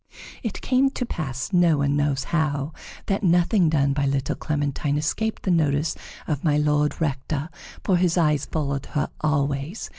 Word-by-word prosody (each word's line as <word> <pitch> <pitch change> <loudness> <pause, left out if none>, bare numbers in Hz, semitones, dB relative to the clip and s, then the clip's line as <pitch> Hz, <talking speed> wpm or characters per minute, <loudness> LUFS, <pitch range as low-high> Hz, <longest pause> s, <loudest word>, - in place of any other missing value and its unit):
It 225 -6 -4
came 265 +1 +3
to 260 -2 -3
pass, 135 - -4
no 175 -3 +4
one 140 0 +1
knows 145 -2 +1
how, 150 -2 0 0.3
that 195 -1 0
nothing 175 0 +3
done 140 -3 +2
by 140 0 0
little 135 -1 0
Clementine 145 -1 -1
escaped 215 +9 -1
the 190 - +1
notice 155 -2 +1 0.3
of 145 -3 -2
My 150 -3 +3
Lord 150 0 +1
Rector, 145 0 -2 0.3
for 185 - +3
his 175 -1 +2
eyes 150 -4 +2
followed 140 -3 -2
her 150 - 0
always. 145 +4 -1
150 Hz, 160 wpm, -24 LUFS, 140-170 Hz, 0.3 s, no